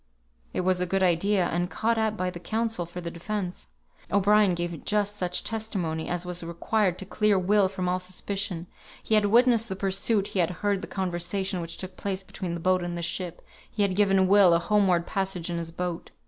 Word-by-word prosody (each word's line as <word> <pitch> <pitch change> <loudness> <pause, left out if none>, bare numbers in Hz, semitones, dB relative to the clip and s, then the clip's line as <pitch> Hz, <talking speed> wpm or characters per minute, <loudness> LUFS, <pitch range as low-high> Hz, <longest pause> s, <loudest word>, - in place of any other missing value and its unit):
It - - -1
was 185 0 +1
a 180 - 0
good 195 +2 +1
idea, 185 +2 +3
and 175 +1 -1
caught 225 +2 0
at 220 -1 0
by 185 -1 -1
the 175 - -8
counsel 220 -3 -1
for 180 +1 -7
the 170 -1 -5
defence. 180 +1 -4 0.4
O'Brien 200 -1 +4
gave 170 -2 -4
just 205 -1 0
such 180 -3 -1
testimony 190 -8 -3
as 175 0 -2
was 180 -1 -3
required 180 +3 0
to 190 - -6
clear 210 +1 +2
Will 195 +1 +3
from 185 -2 -3
all 180 +1 +1
suspicion. 185 -1 -3 0.4
He - - -1
had 210 -1 +5
witnessed 230 0 +4
the 190 - -3
pursuit, 195 +2 0
he 190 - -2
had 170 - +3 0.2
heard 200 -2 +2
the - - -6
conversation 185 0 -2
which 165 0 -6
took 185 -1 -6
place 195 -1 -3
between 180 -2 -5
the - - -5
boat 185 +2 +2
and 175 0 -4
the 170 - -4
ship; 175 0 -4 0.3
he 210 - 0
had 195 -2 +1
given 195 -2 +4
Will 195 -3 +6
a - - +5
homeward 185 -2 +2
passage 190 -3 -2
in 170 - -2
his 165 -1 -4
boat. 175 0 -4
185 Hz, 210 wpm, -27 LUFS, 175-205 Hz, 0.4 s, Will